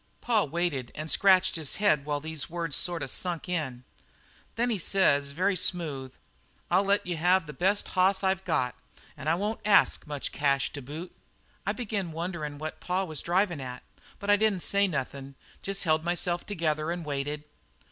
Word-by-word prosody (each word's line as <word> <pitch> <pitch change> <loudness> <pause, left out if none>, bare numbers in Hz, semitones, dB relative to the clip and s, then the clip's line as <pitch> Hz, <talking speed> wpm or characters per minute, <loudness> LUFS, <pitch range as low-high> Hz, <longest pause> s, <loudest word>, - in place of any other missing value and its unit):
"Pa 225 -4 +2
waited 150 -5 -2
and 155 +1 -5
scratched 185 -2 +4
his 155 -4 -2
head 155 -9 +3
while 145 -1 -1
these 155 0 -4
here 175 - -12
words 165 -4 -1
sort 175 -3 -1
of 135 - -3
sunk 175 -2 0
in. 140 -9 -2 0.7
Then 235 -3 +1
says 150 -6 +3
very 185 +7 +1
smooth: 150 -8 -1 0.6
'I'll 190 +3 +4
let 200 +1 +2
you 180 -1 -2
take 180 +2 +3
the 150 - -8
best 195 +5 +1
hoss 190 +1 +3
I've 190 0 +1
got, 125 -7 0 0.4
an' 145 0 -7
I 160 - +4
won't 210 +5 -2
ask 205 -5 +4
much 145 -2 -4
cash 140 -1 +1
to 145 - -5
boot.' 155 +7 -8 0.5
"I - - +2
begin 205 -7 -3
wonderin' 160 -3 -4
what 155 +1 -6
pa 180 +2 0
was 155 -5 -4
drivin' 175 -3 +1
at, 125 -1 -7 0.3
but 200 +1 0
I 205 - +6
didn't 210 -3 +2
say 200 0 +3
nothin' 140 -3 -4 0.3
jest 195 0 -1
held 155 -2 +2
myself 175 0 -1
together 155 -5 -1
and 170 -1 -3
waited. 145 +1 -3
170 Hz, 180 wpm, -28 LUFS, 145-190 Hz, 0.7 s, I